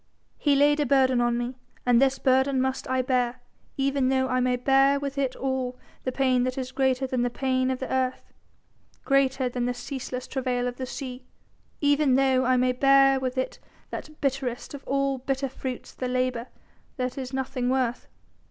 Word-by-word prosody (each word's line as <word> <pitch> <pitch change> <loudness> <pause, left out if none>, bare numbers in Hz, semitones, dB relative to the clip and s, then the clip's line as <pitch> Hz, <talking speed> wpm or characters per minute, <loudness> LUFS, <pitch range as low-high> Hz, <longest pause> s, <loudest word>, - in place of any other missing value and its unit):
He 290 -2 +3
laid 290 +2 +4
a 295 - +2
burden 260 -2 +3
on 240 0 +1
me 245 +2 -4 0.3
and 245 0 +4
this 270 0 +3
burden 265 +1 +2
must 265 0 -1
I 260 0 +1
bear 250 -1 0 0.4
even 275 -1 +1
though 260 0 +2
I 255 - +1
may 250 0 +2
bear 270 +2 +3
with 280 -1 -4
it 265 -2 0
all 260 -1 -2 0.3
the 255 - 0
pain 255 -1 +2
that 255 +1 -2
is 260 -1 -4
greater 265 0 +1
than 255 -1 -1
the 245 - +1
pain 260 0 0
of 260 - -1
the 260 - -4
earth, 260 -1 -2 0.7
greater 270 -1 +2
than 245 0 -2
the 245 0 -1
ceaseless 255 0 -5
travail 250 -2 -1
of 245 - -5
the 260 - -4
sea, 255 -1 -7 0.5
even 285 -2 +3
though 265 -1 +3
I 255 0 +3
may 255 0 +3
bear 270 +1 +5
with 260 0 -3
it 260 - -2 0.3
that 305 0 -7
bitterest 265 -2 -2
of 280 - -8
all 275 -1 0
bitter 270 +1 -2
fruits 255 -1 -6
the 255 - -4
labour 255 -1 -1 0.5
that 255 -1 -2
is 260 -2 -5
nothing 260 -2 -2
worth. 255 -2 0
260 Hz, 190 wpm, -26 LUFS, 250-270 Hz, 0.7 s, bear